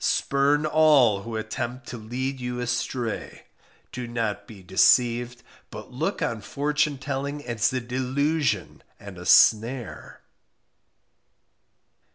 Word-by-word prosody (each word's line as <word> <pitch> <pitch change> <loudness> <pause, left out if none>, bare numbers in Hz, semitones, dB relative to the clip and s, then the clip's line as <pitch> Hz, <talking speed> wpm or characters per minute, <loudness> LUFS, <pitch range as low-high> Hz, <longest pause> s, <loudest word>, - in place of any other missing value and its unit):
spurn 140 +2 +1
all 150 -10 +4
who 115 +2 -7
attempt 120 +3 -4
to - - -7
lead 130 +4 -4
you 125 0 -4
astray; 120 -1 -3 0.5
do 125 -1 -6
not 110 -3 -3
be 100 -4 -13
deceived, 120 +6 +2 0.3
but - - -10
look - - -2
on 115 -2 -2
fortune 145 +5 -1
telling 140 +2 -4
as 120 -2 0
a 130 - -1
delusion 130 +5 -1 0.2
and - - -10
a - - -8
snare. 115 +2 +3
125 Hz, 115 wpm, -25 LUFS, 115-140 Hz, 0.5 s, all